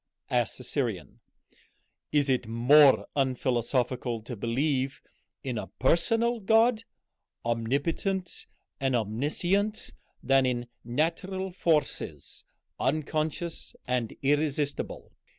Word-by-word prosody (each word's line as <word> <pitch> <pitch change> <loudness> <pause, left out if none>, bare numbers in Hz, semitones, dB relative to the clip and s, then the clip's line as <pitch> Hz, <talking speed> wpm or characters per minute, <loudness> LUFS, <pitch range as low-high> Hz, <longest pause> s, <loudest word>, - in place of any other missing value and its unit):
asked - - +1
the - - -10
Syrian. - - -3 0.9
"Is 145 -1 +3
it 130 -3 +1
more 130 +5 +6
unphilosophical 125 -2 0
to 120 +1 -6
believe 130 +5 -1 0.4
in 125 -4 -2
a - - -6
personal 230 - +2
God, 225 +2 +3 0.6
omnipotent 145 - -1 0.3
and 135 -2 +1
omniscient, 155 - 0 0.3
than 135 0 +4
in 120 -1 -2 0.2
natural 170 +9 -1
forces 165 -4 -1 0.4
unconscious 155 +4 -2
and 125 -3 -1
irresistible? 145 0 -1
140 Hz, 90 wpm, -28 LUFS, 125-170 Hz, 0.9 s, more